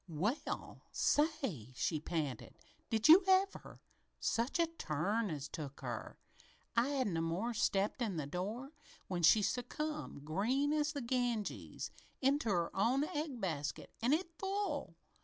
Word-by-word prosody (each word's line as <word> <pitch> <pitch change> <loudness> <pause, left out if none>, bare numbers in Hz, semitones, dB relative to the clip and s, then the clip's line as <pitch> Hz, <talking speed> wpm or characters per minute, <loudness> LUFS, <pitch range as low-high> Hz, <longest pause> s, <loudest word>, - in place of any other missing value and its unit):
"Well, 185 - -2
say!" 265 - +1
she 155 +5 0
panted. 150 -6 -3 0.3
"Did 220 0 +3
you 340 +5 +10
ever! 380 +1 +2 0.4
Such 235 +7 0
a 335 - +4
turn 210 - -1
as 150 -3 -4
took 140 -3 -7
her! - - -5 0.6
I 235 +2 +4
hadn't 265 -9 0
no 165 - 0
more 170 +8 -1
'n - - -2
stepped 205 +1 +1
in 210 -7 -1
the 150 - -2
door 205 - -4 0.4
when 180 -2 -2
she 205 +6 +7
succumbed, 255 - -3
green 245 - +1
as 300 0 +1
the 285 - -3
Ganges, 240 -3 -2 0.3
into 270 -3 +2
her 175 -4 0
own 245 +8 +3
egg 300 -5 -3
basket 155 -8 -3
an' 240 +3 +2
it 340 +3 +1
full! 395 +1 -2
230 Hz, 145 wpm, -36 LUFS, -, 0.6 s, you